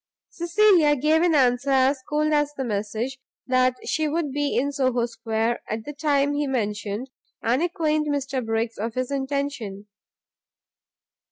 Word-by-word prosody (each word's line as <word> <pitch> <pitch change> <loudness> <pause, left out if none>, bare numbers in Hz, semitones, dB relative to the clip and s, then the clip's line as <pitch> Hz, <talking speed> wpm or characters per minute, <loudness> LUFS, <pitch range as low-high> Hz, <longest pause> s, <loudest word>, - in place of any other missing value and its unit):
Cecilia 345 -3 +4
gave 305 +4 +2
an 345 -2 +3
answer 255 0 +3
as 265 0 +3
cold 305 +1 +1
as 295 -1 +2
the 265 - -1
message; 220 +4 -3 0.3
that 255 0 +2
she 310 0 0
would 305 -1 -1
be 290 +1 -1
in 280 +3 +1
Soho 255 -4 +1
Square 230 0 -2
at 220 +1 -4
the 295 - -6
time 285 -1 +1
he 290 0 -1
mentioned, 210 0 -3 0.3
and 245 +5 +2
acquaint 310 -3 0
Mr 275 -3 -1
Briggs 225 0 -2
of 225 +2 -3
his 255 +1 -2
intention. 270 -7 -3
270 Hz, 150 wpm, -24 LUFS, 235-295 Hz, 0.3 s, Cecilia